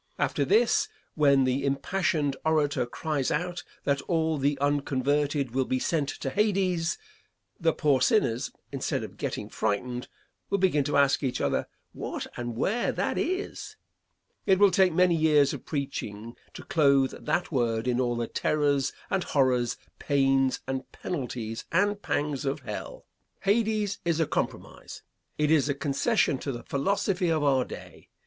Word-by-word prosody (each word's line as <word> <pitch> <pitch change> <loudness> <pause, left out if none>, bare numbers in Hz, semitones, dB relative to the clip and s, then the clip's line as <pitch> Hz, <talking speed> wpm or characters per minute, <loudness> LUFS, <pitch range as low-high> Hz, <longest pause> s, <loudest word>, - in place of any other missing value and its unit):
After - - 0
this, 430 0 +3 0.2
when 140 -3 +4
the 130 +2 0
impassioned 145 +1 0
orator 145 -5 +1
cries 145 +1 -2
out 175 +3 -2 0.2
that 140 -1 +1
all 160 -3 +1
the 140 +1 +1
unconverted 145 -1 0
will 130 +1 0
be 130 - 0
sent 145 +1 0
to 135 - -2
Hades, 185 -4 +1 0.6
the 165 -2 +3
poor 145 -5 +2
sinners, 130 - +2 0.2
instead - - -2
of - - -8
getting - - -4
frightened, 125 +4 -2 0.4
will 200 - +2
begin 180 -7 +2
to 145 - +1
ask 140 -1 +4
each 130 -3 -1
other 70 - 0 0.3
what - - -5
and 120 -1 -4
where 220 - +1
that - - -1
is. 370 +3 -3 0.7
It 190 - +5
will 200 0 +6
take 185 0 +4
many 180 +1 +4
years 150 -3 +4
of - - -7
preaching 115 -6 -4 0.2
to - - -8
clothe 140 -4 +2
that 175 +2 0
word 115 -4 0
in 125 0 +1
all 120 -1 0
the 120 0 -1
terrors 145 0 +1 0.2
and 190 -2 +1
horrors, 125 -4 +1 0.2
pains, 135 -2 +2
and 130 0 -4
penalties 120 -8 -5
and 205 +4 +2
pangs 145 -5 -1
of 140 +1 -2
hell. 105 -5 -7 0.4
Hades 210 -1 +1
is 170 -1 0
a 160 - +3
compromise. - - -4 0.3
It 150 0 +2
is 150 -3 +3
a 140 - +1
concession 140 - +1
to 140 - -3
the 120 -2 -7
philosophy 190 +4 0
of 155 -2 +1
our 135 -3 +3
day. - - -11
145 Hz, 155 wpm, -27 LUFS, 130-170 Hz, 0.7 s, will